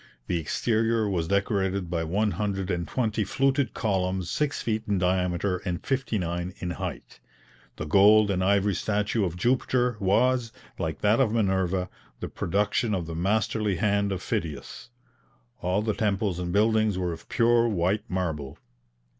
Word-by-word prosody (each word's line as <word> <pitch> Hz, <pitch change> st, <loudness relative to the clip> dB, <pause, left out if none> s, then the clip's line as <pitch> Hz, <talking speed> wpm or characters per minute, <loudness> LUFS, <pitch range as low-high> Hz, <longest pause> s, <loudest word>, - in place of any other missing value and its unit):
The 85 Hz, -, -1 dB
exterior 110 Hz, +6 st, 0 dB
was 85 Hz, -5 st, -1 dB
decorated 100 Hz, -1 st, 0 dB
by 85 Hz, -1 st, -2 dB
one 105 Hz, +6 st, 0 dB
hundred 100 Hz, -3 st, -2 dB
and 85 Hz, -1 st, -2 dB
twenty 110 Hz, -4 st, 0 dB
fluted 135 Hz, +3 st, 0 dB
columns 95 Hz, -3 st, -1 dB
six 150 Hz, -1 st, -1 dB
feet 110 Hz, -1 st, -1 dB
in 100 Hz, -2 st, +1 dB
diameter 90 Hz, +1 st, 0 dB
and 90 Hz, -2 st, -5 dB
fifty 135 Hz, -5 st, -1 dB
nine 90 Hz, 0 st, -3 dB
in 90 Hz, -4 st, -4 dB
height. -, -, -6 dB, 0.6 s
The 80 Hz, -, -5 dB
gold 100 Hz, +5 st, +5 dB
and 95 Hz, -1 st, 0 dB
ivory 100 Hz, +1 st, +2 dB
statue 105 Hz, +3 st, 0 dB
of 90 Hz, -3 st, -2 dB
Jupiter 125 Hz, +2 st, +1 dB
was, 115 Hz, +4 st, +2 dB, 0.3 s
like -, -, -3 dB
that 105 Hz, +2 st, +3 dB
of 125 Hz, -6 st, +3 dB
Minerva, 95 Hz, -4 st, +1 dB, 0.3 s
the -, -, -5 dB
production 105 Hz, +4 st, 0 dB
of 90 Hz, -3 st, -3 dB
the 80 Hz, -, -6 dB
masterly 105 Hz, +3 st, 0 dB
hand 100 Hz, +2 st, +1 dB
of 95 Hz, -2 st, -3 dB
Phidias. 80 Hz, +8 st, -4 dB, 0.7 s
All 90 Hz, +4 st, 0 dB
the 110 Hz, -1 st, 0 dB
temples 100 Hz, -4 st, -1 dB
and 90 Hz, -1 st, -3 dB
buildings 110 Hz, 0 st, +2 dB
were 90 Hz, -2 st, -1 dB
of 80 Hz, -, -12 dB
pure 120 Hz, 0 st, +3 dB
white 95 Hz, +1 st, 0 dB
marble. 80 Hz, -7 st, -3 dB
100 Hz, 155 wpm, -26 LUFS, 90-110 Hz, 0.7 s, gold